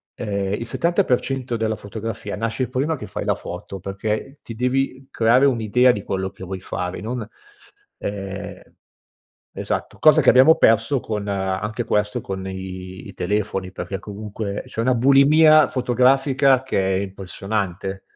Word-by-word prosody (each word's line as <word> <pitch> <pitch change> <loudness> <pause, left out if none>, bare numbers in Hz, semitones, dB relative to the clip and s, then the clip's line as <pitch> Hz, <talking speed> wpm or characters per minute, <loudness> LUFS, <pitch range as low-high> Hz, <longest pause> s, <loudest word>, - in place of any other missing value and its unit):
ehm, 100 -3 -2
il 115 +3 -3
70% 135 - 0
della 110 -1 -1
fotografia 105 0 -6
nasce 115 +3 -2
prima 140 +5 0
che 110 - -8
fai - - -5
la - - +1
foto, 95 - -8
perché 105 - -4
ti 115 - -9
devi 130 +2 -1
creare 120 +4 +4
un'idea 125 0 +3
di 105 - -3
quello 95 0 -3
che - - -12
vuoi 95 0 -6
fare 90 -1 -4
non, 115 0 -4 0.7
ehm 100 -1 -6 0.9
esatto, - - -4
cosa 155 -1 +6
che - - +6
abbiamo 130 +6 +7
perso 115 +3 +3
con 105 -3 -4
anche 100 +3 -2
questo 105 -1 0
con 95 -1 -5
i 95 -1 -7
i - - -10
telefoni, 95 -1 -2
perché 95 0 -5
comunque 105 0 -6
c'è - - -5
una 130 +2 +2
bulimia 145 +5 +6
fotografica 135 +1 +3
che 95 -7 0
è - - +1
impressionante. 95 0 -4
110 Hz, 145 wpm, -22 LUFS, 100-130 Hz, 0.9 s, abbiamo